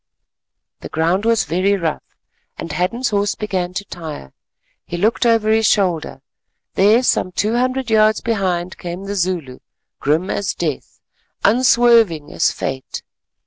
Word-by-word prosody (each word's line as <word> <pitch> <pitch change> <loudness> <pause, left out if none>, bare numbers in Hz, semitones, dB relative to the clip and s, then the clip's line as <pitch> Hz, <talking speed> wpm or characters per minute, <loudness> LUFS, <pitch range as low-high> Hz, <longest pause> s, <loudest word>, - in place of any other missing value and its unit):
The - - -9
ground 170 +6 0
was 230 -1 +3
very 185 +6 +1
rough, 165 -4 -2 0.6
and 165 - -6
Hadden's 220 - -1
horse 205 0 0
began 185 -4 -3
to 200 - -3
tire. 155 - -8 0.5
He 175 - -6
looked 220 +6 +1
over 225 -2 +3
his 220 -1 +3
shoulder—there 190 - 0
some 185 - +1
two 210 +5 0
hundred 255 0 -1
yards 215 -1 +4
behind 185 -5 -2
came 175 +1 -6
the 200 +1 -4
Zulu, 175 -9 -2 0.4
grim 155 +6 0
as 200 -2 -2
Death, 155 -6 -4 0.5
unswerving 230 - +4
as - - +2
Fate. 130 -1 -5
195 Hz, 135 wpm, -19 LUFS, 170-220 Hz, 0.6 s, yards